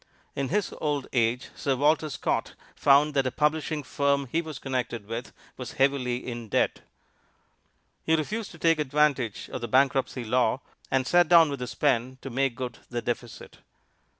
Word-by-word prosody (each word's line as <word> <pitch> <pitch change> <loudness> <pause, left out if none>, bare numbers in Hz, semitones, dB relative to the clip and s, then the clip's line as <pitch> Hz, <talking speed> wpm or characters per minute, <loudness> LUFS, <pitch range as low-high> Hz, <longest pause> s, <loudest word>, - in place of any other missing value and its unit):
In 135 -1 -2
his 205 +2 0
old 145 -3 -1
age 120 0 +1
Sir 135 -2 0
Walter 155 +3 +2
Scott - - -2 0.2
found 145 +2 +4
that 135 -2 +2
a - - -1
publishing 150 +1 0
firm 140 +1 +1
he 165 - +1
was 155 -4 -7
connected 125 -5 -3
with 115 +3 -5 0.3
was 125 -3 -7
heavily 130 -2 +1
in 120 -3 -6
debt. - - +1 1.2
He 160 - +3
refused 210 +8 -2
to - - -12
take 165 -1 +3
advantage 140 -6 +1
of - - -4
the 120 - -3
bankruptcy 130 0 +2
law, 125 +3 +1 0.3
and 130 -1 +1
sat 175 +4 +4
down 165 -3 +6
with 140 - -4
his 125 - -5
pen 130 -2 +1
to 135 - -7
make 135 0 0
good 125 -1 -5
the 120 -1 -3
deficit. 120 -1 -5
135 Hz, 170 wpm, -27 LUFS, 125-150 Hz, 1.2 s, down